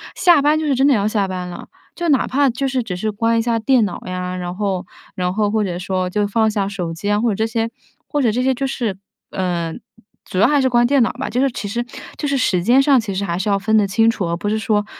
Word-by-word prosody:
下 345 -5 +5
班 295 +2 +3
就 315 - -2
是 290 - +2
真 270 +2 +3
的 285 - +5
要 205 -1 +1
下 210 -2 0
班 185 -1 -4
了， 175 - -9 0.3
就 345 -1 -2
哪 275 -4 +3
怕 280 +1 +2
就 255 +3 -2
是 260 -1 0
只 195 -6 -5
是 215 +4 -2
关 230 +2 +1
一 - - +2
下 230 -1 0
电 240 0 +3
脑 190 - -5
呀， 180 0 -4
然 180 0 -5
后 195 -2 -2 0.3
然 180 -1 -1
后 210 -1 +1
或 220 0 +1
者 180 -3 -3
说， 185 0 -2
就 205 +3 0
放 220 +1 +2
下 205 -2 -1
手 185 -4 -4
机 205 +5 -2
啊， 205 0 +2
或 235 - +2
者 205 - 0
这 220 - 0
些 225 0 -1 0.4
或 290 -2 -1
者 230 - +3
这 245 +4 -1
些 260 0 +1
就 275 - -2
是， 235 -7 -2 0.3
呃， 175 -3 -2 0.5
主 - - -6
要 205 - +5
还 290 0 +3
是 260 - +2
关 240 -1 +3
电 275 +2 +3
脑 230 - +2
吧。 265 +2 -4
就 250 - 0
是 275 - +3
其 210 - -5
实 235 +4 -2 0.3
就 295 - -2
是 280 -1 +1
时 190 -8 +1
间 240 +7 +5
上， 275 -1 +4
其 205 -3 -5
实 200 +1 -1
还 170 -2 -2
是 195 - -1
要 200 - +3
分 200 +3 0
得 205 -2 +3
清 225 +4 +3
楚， 200 -6 -1
而 170 - -1
不 190 - -4
是 215 +1 0
说 210 -1 0
220 Hz, 310 characters per minute, -19 LUFS, 190-250 Hz, 0.5 s, 下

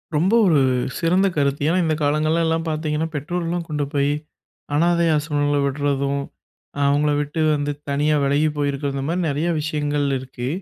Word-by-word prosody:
ரொம்ப 175 +8 +2
ஒரு 160 -6 +4 0.4
சிறந்த 180 +4 +3
கருத்து. 140 0 0
ஏன்னா 170 +3 +2
இந்த 160 -1 +1
காலங்கள்லலாம் 160 +3 +1
பார்த்தீங்கன்னா, 155 0 -1
பெற்றோர்லாம் 170 +3 -3
கொண்டு 150 -2 -1
போயி 140 0 +2 0.6
அனாதை 170 +2 +3
ஆசிரமங்கள்ல 145 -1 0
விடுறதும். 140 0 -1 0.6
அ - - -3
அவங்கள 145 +1 +2
விட்டு 145 +3 -4 0.2
வந்து 145 0 -1 0.2
தனியா 150 +2 +1
விலகி 145 +3 +2
போயிருக்கிறது. 140 -1 -1
இந்த 135 - -3
மாரி 180 +2 0
நெறைய 150 +4 -1
விஷயங்கள் 145 -1 -1
இருக்கு. 125 -1 -6
150 Hz, 145 wpm, -21 LUFS, 145-160 Hz, 0.6 s, ஒரு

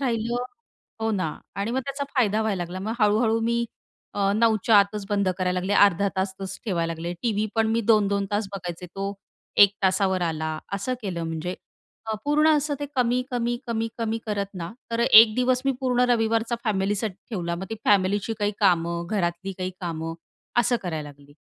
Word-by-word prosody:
राहिलं, 240 -1 -1 0.6
हो 225 0 0
ना 185 -6 -1 0.2
आणि 200 +3 -1
मग 260 - 0
त्याचा 275 +1 -3
फायदा 220 -4 +2
व्हायला 200 -5 -1
लागला. 175 +2 -6
मग 215 +3 -3
हळूहळू 220 +2 +3
मी 235 +1 +1 0.5
अ, 200 -1 +1
9:00 220 +1 +3
च्या 220 -3 +6
आतच 200 +1 +1
बंद 200 -2 +1
करायला 180 0 0
लागले, 190 +3 -2
अर्धा 200 -1 +5
तासचच 190 0 -3
ठेवायला 170 -6 -1
लागले, 170 +2 -4
टीव्ही 215 -2 0
पण 225 -1 +2
मी 230 - +2
2-2 200 -2 +3
तास 205 0 0
बघायचे, 180 -2 -6
तो 195 +3 -4 0.5
1 200 - +1
तासावर 190 -1 +2
आला, 160 -2 -2
असं 200 +6 -1
केलं, 180 -5 -3
म्हणजे 165 +2 -3 0.5
अ, 220 - -1
पूर्ण 300 +2 +3
असं 290 0 -1
ते 290 - -2
कमी, 250 0 +2
कमी, 240 -1 -1
कमी, 225 -1 -1
कमी 225 0 -1
करत 200 -1 -3
ना, 170 +1 -5 0.2
तर 230 - -1
एक 220 -2 +8
दिवस 250 0 +2
मी 275 - +2
पूर्ण 250 -1 +2
रविवारचा 225 0 +1
फॅमिलीसाठी 205 -1 0 0.2
ठेवला, 175 -6 -2
मग 175 +3 -5
ती - - -2
फॅमिलीची 200 +2 +2
काही 205 0 0
कामं, 170 -3 +2
घरातली 190 -2 -1
काही 185 0 -2
कामं 165 -2 -4 0.5
असं 240 +1 +2
करायला 160 -5 -4
लागली. 145 0 -16
205 Hz, 180 wpm, -25 LUFS, 185-230 Hz, 0.6 s, एक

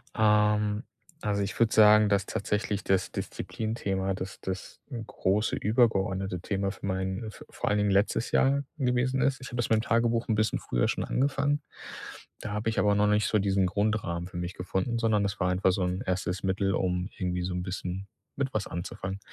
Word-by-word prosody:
Ähm, 105 0 +3 0.4
also, 100 -1 0
ich 100 -1 -3
würde 115 -1 +3
sagen, 105 -1 +7
dass 100 -1 +2
tatsächlich 105 0 -2
das 95 -1 +1
Disziplinthema, 100 -4 -3
das 95 +1 -6
das 95 0 -6 0.3
große 100 +4 0
übergeordnete 95 -5 +1
Thema 100 0 -1
für 100 - -9
meinen 95 +3 -2
v - - -13
vor - - -3
allen 105 - +2
Dingen 105 0 +2
letztes 100 +4 +1
Jahr 140 +1 +3
gewesen 130 -1 +1
ist. 135 -1 +2
Ich 130 - -7
habe - - -7
das 120 - 0
mit 110 - +4
dem - - 0
Tagebuch 115 0 +1
'n 110 - +2
bisschen 110 0 +1
früher - - 0
schon - - -1
angefangen. 145 +2 +1 0.8
Da - - -5
habe 105 +2 -1
ich 110 - -3
aber 105 +1 +4
noch 105 0 +3
nicht 105 0 +3
so 110 - +2
diesen 95 -1 +2
Grundrahmen 95 -3 -1
für 90 - -8
mich 90 +1 -3
gefunden, 95 +6 -2
sondern 110 -3 +2
das 100 0 -2
war 90 -1 +2
einfach 90 +1 +3
so 95 0 0
'n 90 +2 -1
erstes 90 0 -2
Mittel, 95 0 +1
um 90 0 -1
irgendwie 90 -2 -1
so 90 +1 -2
'n 90 0 -2
bisschen 90 +1 -4 0.3
mit 135 -1 -2
was 105 -2 -1
anzufangen. 95 +3 -5
100 Hz, 195 wpm, -28 LUFS, 95-110 Hz, 0.8 s, sagen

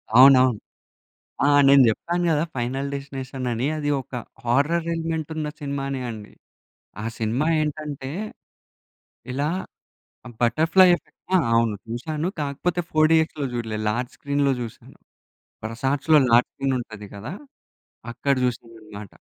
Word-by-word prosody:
అవునవును. 130 -3 +7 0.9
ఆ! - - +4 0.2
నేను 140 -1 +7
చెప్పాను 175 +10 -1
గదా! 150 +1 +2
'ఫైనల్ 130 +3 -2
డెస్టినేషన్' 135 -2 -5
అని 120 +5 -1
అది 145 -1 -2
ఒక 125 - -23 0.3
హారర్ 145 +8 +1
ఎలిమెంట్ 165 -1 -3
ఉన్న 155 -1 -2
సినిమానే 140 -2 -3
అండి. 110 -2 -8 0.7
ఆ - - -5
సినిమా 115 +7 0
ఏంటంటే, 150 -3 -4 1.2
ఇలా 145 +3 -1 0.9
బటర్‌ఫ్లై 160 +10 +5
ఎఫెక్ట్ - - -22
ఆ! - - +7 0.2
అవును, 115 -2 +2
చూసాను. 150 +8 -3
కాకపోతే 165 +5 -1
4డీఎక్స్‌లో 155 -1 +3
చూడలేదు, 110 -2 -3
లార్జ్ 120 +3 -2
స్క్రీన్‌లో 140 -1 +1
చూసాను. 115 -2 -9 0.7
ప్రసాద్‌లో 135 +7 +2
లార్జ్ 120 +1 +5
స్క్రీన్ 135 -1 -1
ఉంటది 110 -3 -9
గదా! 115 - -7 0.8
అక్కడ 140 +3 0
చూసానన్నమాట. 110 -4 -6
135 Hz, 115 wpm, -23 LUFS, 120-150 Hz, 1.2 s, అవునవును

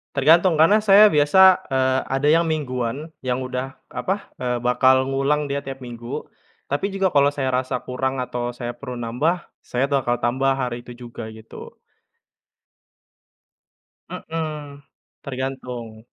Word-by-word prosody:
Tergantung, 160 +4 +4
karena 200 +7 +5
saya 210 0 +7
biasa, 185 +2 +5
eee, 130 0 +2
ada 135 +2 0
yang 165 - +5
mingguan, 140 0 -3
yang 130 0 -2
udah, 130 +1 -5 0.2
apa, 195 +2 -3
eee, 125 -1 0
bakal 130 +2 +3
ngulang 135 +2 0
dia 140 0 -2
tiap 135 -1 -8
minggu. 120 0 -6 0.4
Tapi 145 +8 -2
juga 195 -1 0
kalau 140 0 +5
saya 135 -3 -2
rasa 130 0 0
kurang 130 +1 -2
atau 125 -1 -3
saya 120 0 -5
perlu 120 +1 -8
nambah, 135 +10 -1 0.2
saya 125 +2 -1
bakal 135 -4 0
tambah 130 +3 0
hari 125 -2 -3
itu 120 0 -12
juga 120 -2 -8
gitu. 110 0 -12 2.3
Mmm, 150 -3 -6 0.4
tergantung. 125 -4 -6
130 Hz, 135 wpm, -22 LUFS, 125-150 Hz, 2.3 s, saya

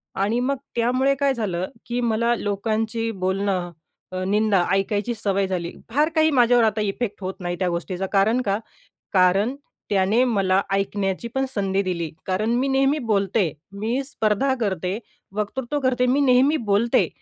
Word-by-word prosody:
आणि 210 +5 +1
मग 270 +3 0 0.2
त्यामुळे 255 +3 +2
काय 280 0 +1
झालं, 190 -7 -2 0.2
की 245 +1 -2
मला 235 0 +1
लोकांची 220 +2 -1
बोलणं 190 -2 -1 0.4
अ, 185 0 -3
निंदा 205 -2 +3
ऐकायची 205 +4 0
सवय 200 -3 0
झाली. 175 -2 -3 0.2
फार 295 +7 +2
काही 315 0 +4
माझ्यावर 245 -2 +5
आता 215 -1 +1
इफेक्ट 210 +1 -3
होत 190 0 -3
नाही 175 -1 -3
त्या 185 - +1
गोष्टीचा. 180 +2 -3
कारण 215 +5 +3
का 200 0 +1 0.6
कारण 195 +6 +3 0.4
त्याने 200 +4 +3
मला 195 -5 +2
ऐकण्याची 195 +2 -1
पण 265 0 +1
संधी 195 -1 0
दिली. 170 -4 -3 0.2
कारण 195 +4 0
मी 270 +2 +1
नेहमी 270 +2 +2
बोलते, 195 -3 +1 0.2
मी 225 +7 -2
स्पर्धा 260 0 +1
करते, 190 -1 -1 0.4
वक्तृत्व 255 +7 -2
करते, 250 -1 +2
मी 265 +3 +2
नेहमी 270 +3 +4
बोलते. 215 +4 +3
210 Hz, 155 wpm, -23 LUFS, 195-245 Hz, 0.6 s, माझ्यावर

